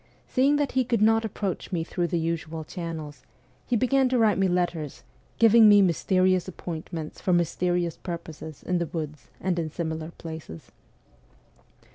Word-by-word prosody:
Seeing 275 +3 +3
that 290 -2 0
he 260 0 +2
could 235 -3 +1
not 225 +1 +4
approach 200 -3 -4
me 170 -3 0
through 175 +1 -2
the 175 - -1
usual 165 -1 -3
channels, 160 -4 -6 0.5
he 245 - +1
began 260 +3 +3
to 255 - +2
write 220 -4 +3
me 195 - +3
letters, 175 -5 -2 0.3
giving 225 -1 +7
me 205 0 +8
mysterious 185 +1 +2
appointments 165 -3 -6
for 185 - +1
mysterious 175 0 0
purposes 160 -3 -7
in 180 -1 0
the 170 - -1
woods 155 -2 -6
and 180 -2 -1
in 160 -2 -2
similar 160 0 -4
places. 160 - -9
175 Hz, 155 wpm, -26 LUFS, 160-205 Hz, 0.5 s, me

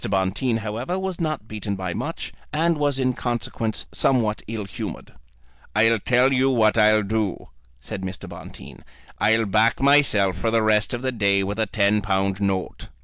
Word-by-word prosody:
Bonteen, 100 +5 0
however, 115 - -3
was 190 -2 -4
not 155 -9 -2
beaten 105 -2 -4
by 95 -2 -4
much, - - -5 0.2
and 165 +3 +1
was 145 -2 +1
in 130 -1 +1
consequence 120 -2 -3
somewhat 115 -5 +1
ill 110 -2 -4
humoured. 95 - -7 0.6
"I'll 115 +1 +4
tell 125 +5 +3
you 130 +1 +3
what 110 -4 +3
I'll 110 -1 +4
do," 105 -1 -2 0.3
said 100 - -7
Mr. 95 0 -6
Bonteen, - - -11 0.4
"I'll 110 +1 +3
back 110 +3 +2
myself 120 -10 +3
for 115 - 0
the 115 0 +2
rest 110 +2 +2
of 120 - -7
the 130 - 0
day 100 -4 +2
for 100 +1 -2
a 110 0 0
ten 105 0 +2
pound 95 -1 -1
note." 95 -2 -2
110 Hz, 170 wpm, -23 LUFS, 100-125 Hz, 0.6 s, I'll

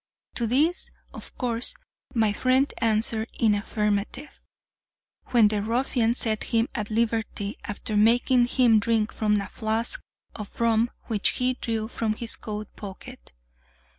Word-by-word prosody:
To 235 - -1
this, 300 +9 +1 0.2
of - - -10
course, 245 - -1 0.4
my 220 -3 +3
friend 260 +5 +2
answered 220 0 +2
in 225 -2 +4
the 205 - +2
affirmative, 210 +6 -2 0.9
when 235 -4 +5
the 210 -1 -1
ruffian 235 +1 +1
set 220 -3 0
him 230 +1 +1
at 210 -5 -3
liberty, 225 -2 -1
after 210 +1 -4
making 240 +3 +4
him 245 -4 +4
drink 220 0 0
from 210 -1 +1
a 200 - -4
flask 220 +1 0 0.3
of 210 -2 -9
rum 230 0 +3
which 215 -4 0
he 255 0 +1
drew 225 -3 -3
from 220 -1 -2
his 230 +1 -4
coat 210 -1 -7
pocket. 190 - -10
225 Hz, 140 wpm, -25 LUFS, 215-240 Hz, 0.9 s, when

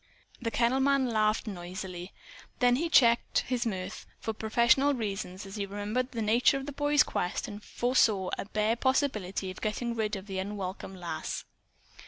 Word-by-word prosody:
The 230 - -1
kennel 240 +3 +2
man 275 0 +3
laughed 215 -1 +2
noisily. 180 -2 -6 0.5
Then 245 0 +4
he 330 +4 -1
checked 235 -6 +4
his 245 -2 -1
mirth, 190 -1 -5
for 220 - -3
professional 235 +6 +3
reasons, 200 -4 -4
as 195 +2 -8
he 200 -1 -2
remembered 210 +6 -2
the 230 -3 -2
nature 235 +5 +4
of 270 - -5
the 290 - -5
boy's 290 +1 +3
quest 180 - -2
and 205 0 -8
foresaw 220 -6 +2
a - - -5
bare 215 +2 +1
possibility 220 -8 0
of 185 - -11
getting 235 +2 -1
rid 220 -2 -1
of 195 -1 -7
the 195 -2 -4
unwelcome 190 -1 -5
Lass. 175 -2 -4
215 Hz, 170 wpm, -29 LUFS, 195-245 Hz, 0.5 s, Then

